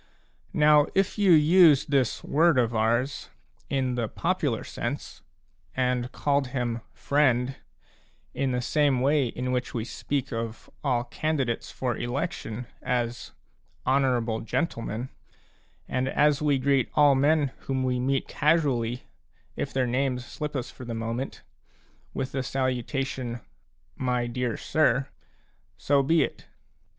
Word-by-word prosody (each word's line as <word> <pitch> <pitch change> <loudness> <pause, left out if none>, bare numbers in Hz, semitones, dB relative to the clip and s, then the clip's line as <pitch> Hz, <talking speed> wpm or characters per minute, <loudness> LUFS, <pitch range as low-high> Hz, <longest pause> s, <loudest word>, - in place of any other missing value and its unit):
Now 150 -1 +5
if 195 +2 +1
you 200 -3 +5
used 155 -2 +6
this 135 -4 +1
word 160 0 +3
of 120 -2 +2
ours 115 +5 0 0.4
a 140 - 0
in 130 -1 0
the 120 -2 -1
popular - - -1
sense, - - -5 0.5
and 125 -1 0
called 140 -2 0
him 120 -3 -2
" - - -37
friend 130 +1 +1 0.4
" - - -34 0.3
in 135 -1 -1
the 125 0 -1
same 145 -2 +2
way 140 0 +3
in 125 +2 -3
which 125 -1 -2
we 115 -2 -2
speak 135 +3 -3
of 115 0 -5
all 125 -4 +1
candidates 135 -1 -2
for 125 -2 -2
election 125 -3 -3 0.2
as 120 -1 -2 0.2
" - - -38
honourable 125 -4 +1
gentle 115 +2 -2
men/' 115 +3 -4 0.8
and 130 +1 -1
as 150 -1 +3
we 145 -2 +3
greet 135 -1 +2
all 145 -1 +6
men 145 +1 +3 0.2
whom 130 -1 0
we 125 -1 0
meet 135 +1 0
casu 155 +1 +2
ally, 120 -3 0 0.6
if - - -3
their 130 -1 +1
names 125 0 -1
slip 150 +2 -5
us 130 - -3
for - - -11
the 120 -2 -5
moment, 115 +4 -4 0.7
with 130 - -3
the 135 - -1
salutation 130 -1 -2 0.6
"my 125 -1 0
dear 120 0 -2
sir/' 135 -4 +1 0.4
— - - -40 0.3
so 140 -1 +2
be 155 +3 +3
it. - - -6
130 Hz, 145 wpm, -27 LUFS, 120-145 Hz, 0.8 s, used